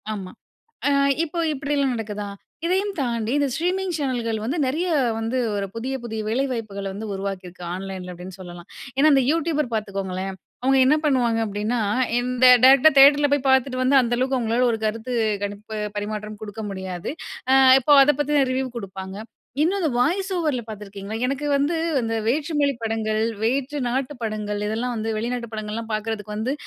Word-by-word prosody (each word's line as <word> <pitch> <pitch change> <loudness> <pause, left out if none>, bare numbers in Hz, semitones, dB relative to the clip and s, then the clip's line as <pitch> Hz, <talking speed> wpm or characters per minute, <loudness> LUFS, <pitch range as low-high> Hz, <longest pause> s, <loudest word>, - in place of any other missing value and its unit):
ஆமா 190 -3 -7 0.6
அ - - +3 0.3
இப்போ 335 +2 -6 0.2
இப்படிலாம் 280 -1 0
நடக்குதா, 210 -2 -4 0.4
இதையும் 390 +3 +1
தாண்டி 235 -3 -1
இந்த 285 -1 +1
ஸ்ட்ரீமிங் 365 +2 -1
சேனல்கள் 240 -5 -1
வந்து, 280 +9 -2
நிறைய 335 +7 -1 0.3
வந்து 225 +3 -1 0.2
ஒரு 200 - -2
புதிய 255 +4 -3
புதிய 220 -1 -4
வேலை 245 +5 +1
வாய்ப்புகள 205 -4 -5
வந்து 210 +1 -6
உருவாக்கியிருக்கு. 185 -2 -6
ஆன்லைன்ல 185 -1 -6
அப்டின்னு 180 +2 -10
சொல்லலாம். 175 -1 -10 0.3
ஏன்னா 305 +3 +5
இந்த 270 - +4
யூடியூபர் 310 -4 0
பாத்துக்கோங்களேன், 195 -2 -3 0.3
அவுங்க 270 +1 +3
என்ன 300 - +5
பண்ணுவாங்க 245 -5 +2
அப்டின்னா, 210 +3 -2 0.4
இந்த 250 +1 +2 0.2
டைரக்ட்டா 275 +3 +7
தியேட்டர்ல 290 +1 +7
போய் 280 -1 -2
பாத்துட்டு 260 -1 +2
வந்து, 265 +2 +4
அந்த 240 0 0
அளவுக்கு 260 +1 +1
அவுங்களால 235 +1 +1
ஒரு 225 - -2
கருத்து 225 +3 -3 0.3
கணிப்பு 205 +2 -6 0.2
பரிமாற்றம் 210 0 -5
குடுக்க 215 +1 -6
முடியாது. 190 -1 -5 0.4
அ - - +7 0.3
இப்போ 295 +3 +3
அதை 295 - +3
பத்தின 290 -1 +2
ரிவ்யூ 260 +1 -1
குடுப்பாங்க. 190 -1 -7 0.4
இன்னு 360 +5 +2
அத 350 - 0
வாய்ஸ் 375 +9 +1
ஓவர்ல 300 -8 0
பாத்துருக்கீங்களா? 205 0 -7
எனக்கு 275 +3 -2
வந்து 285 +4 +1 0.2
அந்த 225 -1 -2
வேற்று 290 +7 0
மொழி 280 -2 +2
படங்கள், 220 -1 -1 0.2
வேற்று 270 +5 0
நாட்டு 265 +3 -2
படங்கள் 210 -2 -3
இதெல்லாம் 235 +4 -2
வந்து, 220 0 -3
வெளிநாட்டு 235 +1 -3
படங்கள்லாம் 215 +1 -5
பாக்கறதுக்கு 215 -1 -4
வந்து 230 +5 -1
235 Hz, 160 wpm, -23 LUFS, 210-275 Hz, 0.6 s, டைரக்ட்டா